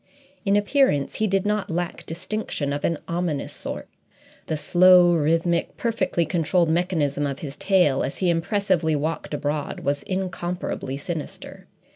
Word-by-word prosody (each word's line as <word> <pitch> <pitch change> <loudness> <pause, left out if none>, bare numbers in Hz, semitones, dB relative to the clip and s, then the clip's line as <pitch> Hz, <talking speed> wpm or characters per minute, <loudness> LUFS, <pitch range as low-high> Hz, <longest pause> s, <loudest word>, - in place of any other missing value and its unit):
In 200 0 +3
appearance 205 - +2
he 215 - +1
did 195 0 +1
not 210 -1 0
lack 175 0 -3
distinction 165 -4 -3
of 145 - -4
an 165 - +1
ominous 170 -4 -2
sort; - - -6 0.6
the 155 - -1
slow, 175 +3 +6
rhythmic, 165 +2 +1
perfectly 195 -7 0
controlled 170 0 +1
mechanism 160 -4 0
of 140 -1 -4
his 140 -3 -7
tail, 180 -9 +3
as - - -4
he 180 -2 +2
impressively 175 -2 +1
walked 155 +2 -3
abroad, 145 0 -3
was 140 0 -1
incomparably 180 -7 -3
sinister. 160 +1 -7
170 Hz, 140 wpm, -24 LUFS, 150-185 Hz, 0.6 s, slow